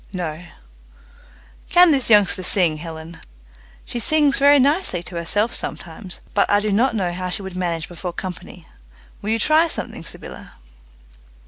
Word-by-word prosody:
"No," 170 -2 -5 1.3
"Can 355 -1 +6
this 270 -5 +1
youngster 205 -3 +5
sing, 175 -4 +1
Helen?" 160 +1 -9 0.7
"She 240 - -5
sings 295 +2 +2
very 285 +1 +6
nicely 280 - +1
to 175 - -10
herself 205 +7 -1
sometimes, 175 +2 -4
but 205 - +2
I 205 - +4
do 210 0 -2
not 235 +4 +2
know 185 -4 -1
how 185 +1 -4
she 195 +2 0
would 190 -1 -8
manage 170 -3 -3
before 175 +1 -6
company. 180 -1 -8 0.6
Will 205 - -5
you 225 - +2
try 310 +8 +3
something, - - -5
Sybylla?" - - -10
190 Hz, 150 wpm, -21 LUFS, 175-245 Hz, 1.3 s, Can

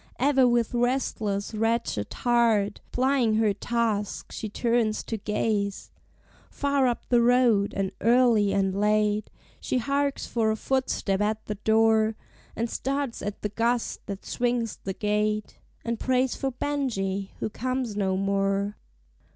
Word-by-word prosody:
Ever 265 -1 +4
with 240 -1 +1
restless, 235 -5 -1
wretched 225 - -1
heart, 230 -4 +2
Plying 255 -3 +2
her 215 -2 +3
task, 225 -3 -2
she 215 - -5
turns 230 0 0
to 225 - -4
gaze 210 -1 -2 0.6
Far 280 -2 +1
up 240 - -2
the 240 -1 +4
road; 235 -4 +4
and 195 -1 -1
early 230 -4 +4
and 195 -1 +1
late 210 +1 +1 0.3
She - - -1
harks 280 +3 0
for 225 -2 0
a 220 - +1
footstep 220 -5 -1
at 215 +1 -1
the 210 - -3
door, 220 +1 +3 0.4
And 230 - -1
starts 275 +1 -3
at 205 0 -5
the 210 - 0
gust 230 +3 -1
that 200 -1 -6
swings 240 -2 -1
the 190 - -5
gate, 210 +1 -1 0.3
And 235 -1 -2
prays 260 0 +1
for 270 - -2
Benjie, 220 -9 -2
who - - -3
comes 255 -1 -2
no 190 -2 0
more. 195 +1 0
220 Hz, 140 wpm, -26 LUFS, 205-245 Hz, 0.6 s, Ever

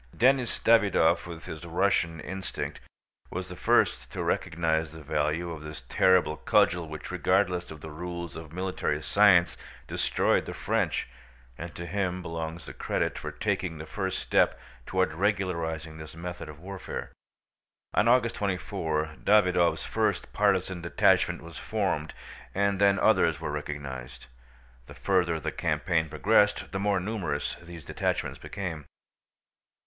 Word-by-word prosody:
Denís 130 0 +3
Davýdov, 105 -8 +4
with 85 -1 -8
his 80 +1 -7
Russian 85 -1 +1
instinct, 95 +3 -5 0.5
was 95 +1 -5
the 90 - -7
first - - +2
to - - -3
recognize 80 -1 0
the 80 -1 -11
value 80 +4 0
of 80 -2 -7
this 75 -2 -8
terrible 90 -4 +4
cudgel 85 +2 +3
which 75 0 -7
regardless 90 -2 +1
of 75 -2 -10
the 80 - -8
rules 85 +1 -6
of 80 -1 -8
military 90 +2 -2
science 95 -4 +5 0.3
destroyed - - +1
the - - -5
French, - - 0 0.5
and 85 +5 -8
to 85 - -5
him 90 0 -2
belongs 80 0 -5
the - - -8
credit - - -1
for - - -5
taking 85 -4 -2
the 75 - -7
first 95 +2 -3
step - - +2 0.3
toward 95 -4 +1
regularizing 85 -4 -1
this 80 0 -9
method 85 -1 -6
of 75 -1 -10
warfare. 95 +2 -6 0.8
On 110 - +3
August 120 -1 +4
24 80 -5 -2
Davýdov's 90 -5 +4
first 110 -2 -1
partisan 95 -3 +1
detachment 85 - +2
was - - -9
formed 95 -8 -1 0.4
and 100 0 +1
then 100 -1 +5
others - - +3
were - - -3
recognized. 70 -4 -6 0.6
The - - -11
further 90 -4 +1
the - - -3
campaign 80 -3 0
progressed 105 +6 +3
the 95 - -2
more 100 -1 +2
numerous 90 -8 -2
these 85 -3 -10
detachments - - -2
became. 85 -7 -5
85 Hz, 140 wpm, -28 LUFS, 80-95 Hz, 0.8 s, science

